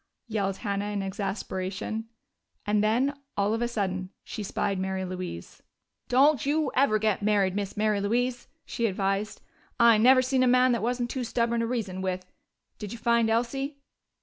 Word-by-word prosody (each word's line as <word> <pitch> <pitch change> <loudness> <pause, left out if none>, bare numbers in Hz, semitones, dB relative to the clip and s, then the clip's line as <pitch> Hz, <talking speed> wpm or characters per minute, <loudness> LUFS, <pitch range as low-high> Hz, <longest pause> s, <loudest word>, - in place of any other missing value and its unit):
yelled 200 -3 -1
Hannah 200 -2 -2
in 205 -1 -2
exasperation. 195 +2 -4 0.6
And 210 0 +2
then, 245 +6 +2 0.2
all 205 +1 +2
of 225 - -1
a 240 - +1
sudden, 190 -5 -2
she - - -6
spied 195 -1 -1
Mary 190 0 -2
Louise. 180 - -7 0.5
"Don't 275 +1 +4
you 295 0 +1
never 255 -5 +4
get 215 -1 0
married, 200 -2 +2
Miss 200 -1 -3
Mary 210 -1 +1
Louise," 240 +4 -1 0.2
she 235 - -1
advised. 195 +1 -2 0.4
"I 235 -2 +6
never 255 +3 +6
seen 260 0 +1
a 255 - +4
man 250 +1 +5
that 235 -3 0
wasn't 240 +1 -1
too 260 - -2
stubborn 235 0 0
to 230 - 0
reason 205 -6 -3
with. 185 -1 -2 0.5
Did 205 -2 -6
you 235 - -6
find 235 -1 +2
Elsie?" 270 +5 -1
215 Hz, 170 wpm, -27 LUFS, 195-240 Hz, 0.6 s, I